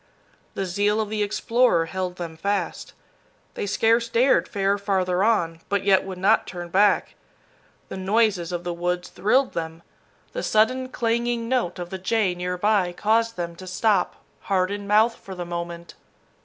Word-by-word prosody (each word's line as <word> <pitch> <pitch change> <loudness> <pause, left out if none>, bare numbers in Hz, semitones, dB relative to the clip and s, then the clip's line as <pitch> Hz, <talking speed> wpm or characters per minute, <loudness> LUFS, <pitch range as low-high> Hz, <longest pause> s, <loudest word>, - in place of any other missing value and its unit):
The 195 - -2
zeal 205 +4 +1
of 215 -1 -1
the 215 0 -2
explorer 215 -2 +2
held 185 +1 -4
them 170 -3 -6
fast. 200 +5 -3 0.6
They - - -4
scarce 230 +3 +2
dared 230 -8 +3
fare 200 0 0
farther 190 -2 0
on, 170 -7 +1
but 200 -1 0
yet 195 -1 +4
would 190 -1 -6
not 200 +4 +3
turn 175 -1 -7
back. 200 +3 +3 0.8
The - - -6
noises 190 -3 +1
of 175 -1 -3
the 175 - -3
woods 175 +1 -2
thrilled 255 +7 +1
them. 165 0 -5 0.5
The - - -3
sudden 255 +4 +2
clanging 235 -1 -1
note 235 -8 0
of 175 -1 -6
the 190 - -5
jay 195 0 +1
near 180 0 -3
by 195 -2 +2
caused 225 +4 +1
them 170 -1 -4
to 185 - -10
stop, 195 0 +1 0.2
heart 185 -1 0
in 205 0 -5
mouth 215 +3 +4
for 190 - -10
the 175 -1 -5
moment. 170 0 -6
195 Hz, 170 wpm, -24 LUFS, 180-220 Hz, 0.8 s, yet